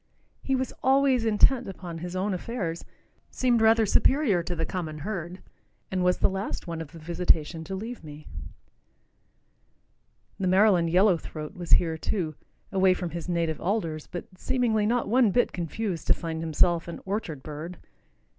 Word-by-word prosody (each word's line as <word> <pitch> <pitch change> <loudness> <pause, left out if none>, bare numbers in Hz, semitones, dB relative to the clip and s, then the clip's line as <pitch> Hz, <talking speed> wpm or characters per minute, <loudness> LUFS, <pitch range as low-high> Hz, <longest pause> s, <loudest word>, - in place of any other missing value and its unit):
He 270 - 0
was 260 0 -2
always 265 -2 +3
intent 235 +4 +4
upon 175 -3 -7
his 175 +2 -6
own 195 +2 0
affairs, 180 -4 -4 0.5
seemed 245 -3 +2
rather 225 0 +5
superior 230 - +3
to 175 +1 -4
the 165 -1 -1
common 160 -4 -4
herd, 180 +1 -5 0.5
and 185 -1 0
was 180 0 +3
the - - +3
last 195 +1 -4
one 165 -2 -4
of 160 - -8
the 165 - -11
visitation 165 -1 0
to 190 - -4
leave 225 +3 -6
me. 150 0 -10 2.1
The 190 - 0
Maryland 185 -2 +4
yellow 185 +1 +4
throat 155 0 -7
was 175 -2 -2
here, 160 -2 +4
too, 170 -5 -2 0.4
away 190 -1 +4
from 175 -2 -4
his 170 +2 -5
native 165 -3 -1
alders, 170 -6 -2
but 175 - -6
seemingly 225 -5 +1
not 240 +1 +1
one 240 0 +4
bit 245 +5 +2
confused 175 0 -3
to - - +5
find 165 -2 -4
himself 165 +1 +2
an 170 - -6
orchard 190 -8 -3
bird. 155 +4 -7
180 Hz, 165 wpm, -27 LUFS, 165-215 Hz, 2.1 s, rather